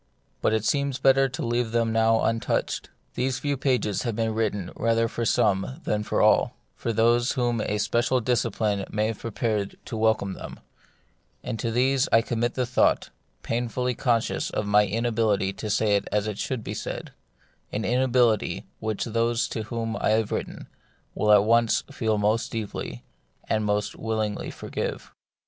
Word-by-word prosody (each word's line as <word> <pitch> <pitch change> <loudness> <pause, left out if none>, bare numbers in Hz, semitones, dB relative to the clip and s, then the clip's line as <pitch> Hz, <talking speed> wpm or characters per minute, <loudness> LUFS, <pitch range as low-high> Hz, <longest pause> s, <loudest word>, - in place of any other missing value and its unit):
But - - +2
it 110 -1 0
seems 140 0 +1
better 135 0 +4
to 130 - -4
leave 120 -1 -1
them 115 -1 +2
now 115 0 +3
untouched. 115 0 -1 0.2
These 130 0 -1
few 145 +2 -1
pages 125 -7 0
have 115 -3 -2
been 115 0 0
written 105 -5 -1
rather 115 0 +2
for 115 +1 -3
some 105 - +1
than 105 0 0
for - - 0
all, - - +4 0.2
for 115 - -2
those 120 +3 +3
whom 120 -4 0
a 105 - -1
special 120 +4 +1
discipline 110 -4 0
may 105 0 0
have 110 -1 -3
prepared 110 -3 -2
to - - -5
welcome 110 -3 +1
them; - - -9 0.8
and 110 - -4
to 115 - -1
these 130 +5 +2
I 115 - +5
commit 120 +1 -1
the 125 - 0
thought, 125 +1 +2 0.3
painfully 120 +2 -1
conscious 120 -2 0
of 105 - -2
my 105 0 +4
inability 110 -3 +1
to 105 +3 -6
say 105 0 +2
it 100 - -1
as 105 -1 +1
it 105 -2 -4
should 130 -4 -3
be - - -5
said, - - -5 0.6
an 110 +1 -2
inability 125 -2 +2
which 110 -1 -2
those 115 0 +1
to 110 - -4
whom 115 0 -3
I - - +2
have 110 -1 +1
written - - -4 0.5
will 105 - +2
at 105 -1 +7
once 115 +1 +3
feel 110 -6 0
most 105 +2 +1
deeply, 105 - -5 0.4
and 110 -1 +1
most 105 0 -1
will 110 0 -3
ingly 105 -1 -2
forgive. - - -5
115 Hz, 170 wpm, -26 LUFS, 105-120 Hz, 0.8 s, at